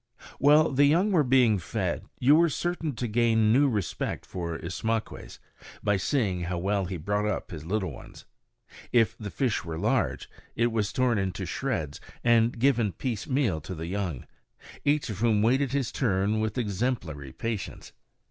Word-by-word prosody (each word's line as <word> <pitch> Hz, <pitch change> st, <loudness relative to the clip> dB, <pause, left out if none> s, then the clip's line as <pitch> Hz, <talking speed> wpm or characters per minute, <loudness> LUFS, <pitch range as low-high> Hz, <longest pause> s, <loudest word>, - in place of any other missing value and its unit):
While 150 Hz, +3 st, +5 dB
the 140 Hz, +2 st, +4 dB
young 175 Hz, +8 st, +3 dB
were 165 Hz, -6 st, +4 dB
being 125 Hz, -5 st, +4 dB
fed, 80 Hz, -4 st, -2 dB
you 140 Hz, +4 st, +5 dB
were 170 Hz, +1 st, +4 dB
certain 165 Hz, -2 st, -2 dB
to 120 Hz, -, -2 dB
gain 110 Hz, -1 st, +3 dB
new 140 Hz, +3 st, +4 dB
respect 105 Hz, -8 st, -3 dB
for 85 Hz, -2 st, -4 dB
Ismaques 110 Hz, +7 st, -4 dB, 0.5 s
by 105 Hz, -1 st, +2 dB
seeing 95 Hz, -5 st, 0 dB
how 90 Hz, 0 st, -2 dB
well 100 Hz, +2 st, 0 dB
he 90 Hz, 0 st, -4 dB
brought 105 Hz, +6 st, -1 dB
up 105 Hz, -, -3 dB
his 80 Hz, -2 st, -8 dB
little 95 Hz, -3 st, -1 dB
ones. 65 Hz, -, -12 dB, 0.7 s
If 115 Hz, -2 st, +3 dB
the 105 Hz, -2 st, -5 dB
fish 125 Hz, +1 st, -1 dB
were 80 Hz, -1 st, -5 dB
large, -, -, 0 dB, 0.3 s
it 120 Hz, +1 st, +2 dB
was 110 Hz, -3 st, 0 dB
torn 125 Hz, -4 st, +1 dB
into 95 Hz, -1 st, -2 dB
shreds 75 Hz, -2 st, -3 dB, 0.2 s
and 120 Hz, 0 st, +3 dB
given 120 Hz, -5 st, +2 dB
piecemeal 115 Hz, -, -1 dB
to 90 Hz, +5 st, -7 dB
the 80 Hz, 0 st, -5 dB
young, 90 Hz, -6 st, -3 dB, 0.6 s
each 145 Hz, -4 st, +1 dB
of 100 Hz, -, -6 dB
whom 110 Hz, -2 st, +3 dB
waited 130 Hz, +4 st, +3 dB
for 140 Hz, -, 0 dB
his 135 Hz, -4 st, -1 dB
turn 105 Hz, -3 st, +1 dB
with 110 Hz, +2 st, -2 dB
exemplary 100 Hz, -, -2 dB
patience. 115 Hz, -, -5 dB
110 Hz, 165 wpm, -27 LUFS, 95-130 Hz, 0.7 s, While